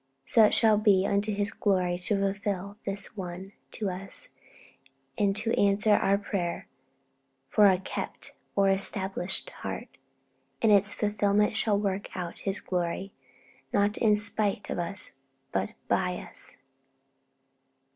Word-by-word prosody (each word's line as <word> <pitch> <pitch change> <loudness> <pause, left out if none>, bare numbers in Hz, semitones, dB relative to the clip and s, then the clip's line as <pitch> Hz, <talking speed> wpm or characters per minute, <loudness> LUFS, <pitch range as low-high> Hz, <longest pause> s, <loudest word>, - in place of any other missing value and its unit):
So 225 - +5
it - - +2
shall 220 -2 +4
be 200 -3 +4
unto 200 +2 +1
His 205 0 0
glory 185 -3 +1
to 185 +3 -1
fulfil 200 0 -2
this 195 +2 -1
one 185 0 -7 0.2
to 205 -3 -3
us, 190 +2 -1 0.9
and 200 -1 +1
to 225 +2 0
answer 205 +1 +3
our 200 -1 +3
prayer 195 -4 -3 0.8
for 210 +6 +5
a 185 - +3
'kept' 190 - -6 0.2
or 195 -1 +4
'established' 195 -1 +1
heart. - - -6 0.7
And 225 - +3
its 200 -1 +4
fulfilment 210 0 +1
shall 210 -1 +2
work 200 -1 -3
out 175 -2 -5
His 195 0 0
glory, 180 +2 -3 0.6
not 205 +1 +2
in 215 -2 +3
spite 210 -1 +1
of - - -2
us, 175 -5 -1 0.3
but 95 0 -2
'by 180 -1 0
us.' - - -6
200 Hz, 135 wpm, -28 LUFS, 190-210 Hz, 0.9 s, So